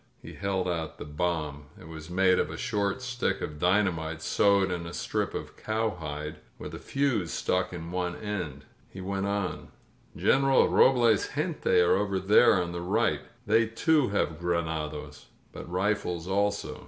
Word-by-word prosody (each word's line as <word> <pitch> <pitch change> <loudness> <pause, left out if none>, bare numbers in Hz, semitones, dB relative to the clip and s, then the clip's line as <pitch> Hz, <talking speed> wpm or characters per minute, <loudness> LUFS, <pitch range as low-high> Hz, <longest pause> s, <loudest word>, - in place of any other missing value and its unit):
He - - -11
held 95 -2 -2
out 80 -3 -3
the - - -7
bomb. 75 -2 -2
It - - -12
was 80 0 -9
made 95 +1 +3
of - - 0
a 80 - -6
short 105 +1 -1
stick 125 -1 -1
of 75 -1 -6
dynamite 85 -4 +1
sewed 100 -2 +3
in 85 -1 -3
a 85 - -7
strip - - -2
of - - -6
cowhide, 80 -9 -3 0.2
with - - -8
a - - -6
fuse 135 -11 0
stuck 90 0 0
in 85 -1 -7
one 90 -1 -2
end. 90 -10 -5 0.2
He 95 - -10
went 95 +1 -2
on: 100 -2 -2 0.5
"Greneral 135 0 +4
Robles' 120 -5 +4
gente - - +1
are 90 - +4
over 100 -1 0
there 100 +1 +5
on 85 -1 -2
the 85 0 -4
right. 105 +6 +1 0.2
They, 110 +1 +3
too, 145 +5 +2
have 85 -6 -1
granados, 80 -4 -3 0.2
but - - -9
rifles 90 -2 -1
also. 100 +2 -1
90 Hz, 165 wpm, -28 LUFS, 80-105 Hz, 0.5 s, there